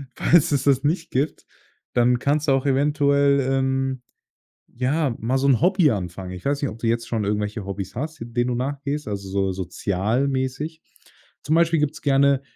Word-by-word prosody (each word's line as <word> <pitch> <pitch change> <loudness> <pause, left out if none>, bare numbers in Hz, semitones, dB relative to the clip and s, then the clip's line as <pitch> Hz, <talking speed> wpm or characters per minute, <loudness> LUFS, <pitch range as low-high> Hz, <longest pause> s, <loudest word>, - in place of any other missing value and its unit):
Falls 170 -1 +3
es 140 -2 +1
das 135 0 +3
nicht 165 +3 -1
gibt, 140 +4 -2 0.5
dann 120 0 +3
kannst 145 +3 0
du 135 - +4
auch 135 0 0
eventuell, 140 0 +3
ähm, 135 -1 0 0.7
ja, 130 +2 -1
mal 125 +4 0
so 135 - +1
'n 130 - +4
Hobby 180 -2 +4
anfangen. 90 -2 -4
Ich 90 - -9
weiß 140 +1 -1
nicht, 140 - 0
ob 110 - -10
du 115 - -3
jetzt 115 0 0
schon 110 -3 -1
irgendwelche 105 0 -2
Hobbys 100 0 -6
hast, 155 +5 -5
denen 120 +1 -2
du 125 - -1
nachgehst, 140 +2 -3
also 100 -1 -5
so 95 0 0
sozialmäßig. 130 - -2 0.6
Zum 150 - 0
Beispiel 165 0 +3
gibt's 150 -1 -2
gerne 140 -1 +3
135 Hz, 175 wpm, -23 LUFS, 115-145 Hz, 0.7 s, du